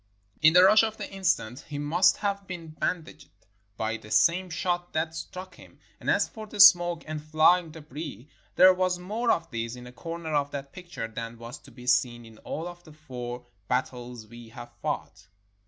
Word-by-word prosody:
In 160 Hz, +1 st, +7 dB
the 180 Hz, +1 st, +8 dB
rush 215 Hz, +3 st, +7 dB
of 220 Hz, -1 st, -2 dB
the -, -, -5 dB
instant 175 Hz, -, 0 dB
he 145 Hz, -, -6 dB
must 165 Hz, +5 st, +3 dB
have 200 Hz, -1 st, -2 dB
been 170 Hz, -3 st, -7 dB
bandaged 155 Hz, -2 st, -4 dB, 0.5 s
by 110 Hz, +1 st, -2 dB
the 105 Hz, -, -14 dB
same 170 Hz, +13 st, +3 dB
shot 175 Hz, +1 st, -2 dB
that 160 Hz, +1 st, -1 dB
struck 180 Hz, +3 st, -8 dB
him, -, -, -16 dB, 0.2 s
and -, -, -4 dB
as -, -, +3 dB
for 220 Hz, -1 st, -10 dB
the 210 Hz, -, -9 dB
smoke 175 Hz, -4 st, +7 dB
and 155 Hz, -1 st, -5 dB
flying 160 Hz, +3 st, +4 dB
debris, 150 Hz, -5 st, -8 dB, 0.3 s
there 185 Hz, 0 st, +8 dB
was 185 Hz, 0 st, 0 dB
more 215 Hz, +7 st, -2 dB
of 165 Hz, -4 st, +1 dB
this 115 Hz, +1 st, -4 dB
in 125 Hz, 0 st, -11 dB
a 125 Hz, -, -10 dB
corner 165 Hz, +5 st, -6 dB
of 145 Hz, -1 st, +1 dB
that 140 Hz, -1 st, -7 dB
picture 175 Hz, -10 st, -7 dB
than 115 Hz, +1 st, -7 dB
was 115 Hz, +1 st, -9 dB
to -, -, -17 dB
be 125 Hz, +1 st, -13 dB
seen 120 Hz, -2 st, +1 dB
in 110 Hz, -1 st, -15 dB
all 160 Hz, -, -5 dB, 0.2 s
the 155 Hz, -, -15 dB
four 125 Hz, -5 st, -7 dB, 0.2 s
battles 125 Hz, -2 st, -3 dB
we 120 Hz, +1 st, -13 dB
have 120 Hz, 0 st, -10 dB
fought 95 Hz, -, -4 dB
155 Hz, 190 wpm, -27 LUFS, 125-180 Hz, 0.5 s, the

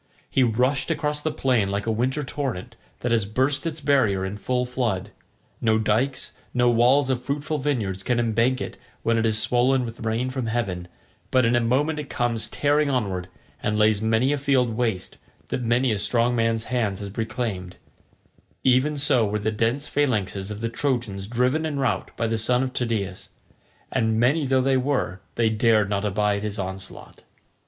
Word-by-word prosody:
He 135 Hz, -, +3 dB
rushed 125 Hz, +3 st, +2 dB
across 150 Hz, 0 st, -1 dB
the 155 Hz, -, 0 dB
plain 120 Hz, -7 st, +1 dB
like 100 Hz, +1 st, -2 dB
a 115 Hz, -, +1 dB
winter 130 Hz, +6 st, 0 dB
torrent 130 Hz, -8 st, -4 dB, 0.3 s
that 120 Hz, -, -1 dB
has 110 Hz, -4 st, +2 dB
burst 135 Hz, +7 st, 0 dB
its 160 Hz, -1 st, -4 dB
barrier 115 Hz, -10 st, +2 dB
in 95 Hz, +2 st, -4 dB
full 125 Hz, +4 st, -1 dB
flood; 120 Hz, -7 st, -2 dB, 0.5 s
no 110 Hz, -1 st, +3 dB
dykes, 120 Hz, +5 st, 0 dB, 0.2 s
no 125 Hz, -1 st, +4 dB
walls 125 Hz, +4 st, +4 dB
of 125 Hz, -2 st, -1 dB
fruitful 145 Hz, +3 st, -2 dB
vineyards 115 Hz, -10 st, -1 dB
can 120 Hz, +4 st, 0 dB
embank 120 Hz, +2 st, +2 dB
it -, -, -5 dB, 0.3 s
when 115 Hz, -, +2 dB
it 115 Hz, -, +2 dB
is 110 Hz, -1 st, +1 dB
swollen 125 Hz, +2 st, +2 dB
with 115 Hz, 0 st, -8 dB
rain 115 Hz, +3 st, -1 dB
from 130 Hz, -3 st, -3 dB
heaven, 100 Hz, -7 st, -2 dB, 0.4 s
but 130 Hz, -2 st, +3 dB
in 115 Hz, +1 st, +3 dB
a 120 Hz, -, +3 dB
moment 145 Hz, +7 st, +1 dB
it 145 Hz, -, -6 dB
comes 115 Hz, -4 st, -1 dB
tearing 145 Hz, 0 st, +2 dB
onward, 100 Hz, -9 st, -1 dB, 0.3 s
and 105 Hz, 0 st, 0 dB
lays 105 Hz, -1 st, +3 dB
many 110 Hz, +5 st, +2 dB
a 145 Hz, -, -1 dB
field 135 Hz, -4 st, +2 dB
waste 110 Hz, -6 st, -2 dB, 0.3 s
that -, -, -2 dB
many 120 Hz, +2 st, +2 dB
a 105 Hz, -, 0 dB
strong 120 Hz, +3 st, +2 dB
man's 115 Hz, -1 st, +1 dB
hand 115 Hz, -6 st, -1 dB
has 100 Hz, 0 st, -7 dB
reclaimed—even 120 Hz, +5 st, -3 dB
so 130 Hz, -4 st, +3 dB
were 105 Hz, 0 st, 0 dB
the 105 Hz, +1 st, -1 dB
dense 115 Hz, +6 st, 0 dB
phalanxes 105 Hz, -9 st, 0 dB
of 105 Hz, 0 st, -6 dB
the 115 Hz, -, -1 dB
Trojans 115 Hz, -6 st, -2 dB
driven 125 Hz, +7 st, +1 dB
in 155 Hz, -3 st, -2 dB
rout 125 Hz, -8 st, 0 dB
by 115 Hz, -, 0 dB
the 115 Hz, 0 st, 0 dB
son 125 Hz, +3 st, +2 dB
of 130 Hz, -1 st, -3 dB
Tydeus, 105 Hz, -7 st, -2 dB, 0.6 s
and 110 Hz, -1 st, +1 dB
many 140 Hz, +5 st, +2 dB
though 130 Hz, 0 st, +3 dB
they 135 Hz, 0 st, +2 dB
were, 125 Hz, -8 st, -1 dB
they 115 Hz, -1 st, +2 dB
dared 110 Hz, -2 st, +3 dB
not 100 Hz, 0 st, 0 dB
abide 105 Hz, 0 st, +1 dB
his 105 Hz, 0 st, -4 dB
onslaught. 95 Hz, -1 st, -7 dB
120 Hz, 180 wpm, -24 LUFS, 105-130 Hz, 0.6 s, no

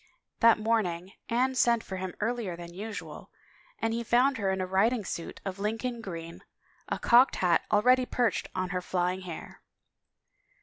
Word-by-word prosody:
That 230 Hz, -1 st, +6 dB
morning 200 Hz, -5 st, 0 dB, 0.2 s
Anne 255 Hz, +3 st, +2 dB
sent 235 Hz, -2 st, +3 dB
for 190 Hz, -, -6 dB
him 185 Hz, -1 st, -5 dB
earlier 220 Hz, -5 st, -2 dB
than 170 Hz, 0 st, -9 dB
usual 210 Hz, +3 st, -7 dB, 0.5 s
and 225 Hz, -, -1 dB
he 235 Hz, +1 st, -2 dB
found 250 Hz, +3 st, +3 dB
her 195 Hz, -2 st, 0 dB
in 190 Hz, 0 st, 0 dB
a 185 Hz, -, 0 dB
riding 205 Hz, +4 st, +1 dB
suit 170 Hz, -, -5 dB
of 195 Hz, 0 st, -4 dB
Lincoln 225 Hz, +3 st, -2 dB
green, 170 Hz, -5 st, -7 dB, 0.5 s
a -, -, -1 dB
cocked 245 Hz, +3 st, +5 dB
hat 175 Hz, -3 st, +2 dB
already 250 Hz, +4 st, +4 dB
perched 240 Hz, -2 st, 0 dB
on 185 Hz, 0 st, -1 dB
her 180 Hz, -1 st, -2 dB
flying 180 Hz, +1 st, -1 dB
hair. 175 Hz, -3 st, -9 dB
210 Hz, 165 wpm, -29 LUFS, 185-235 Hz, 0.5 s, That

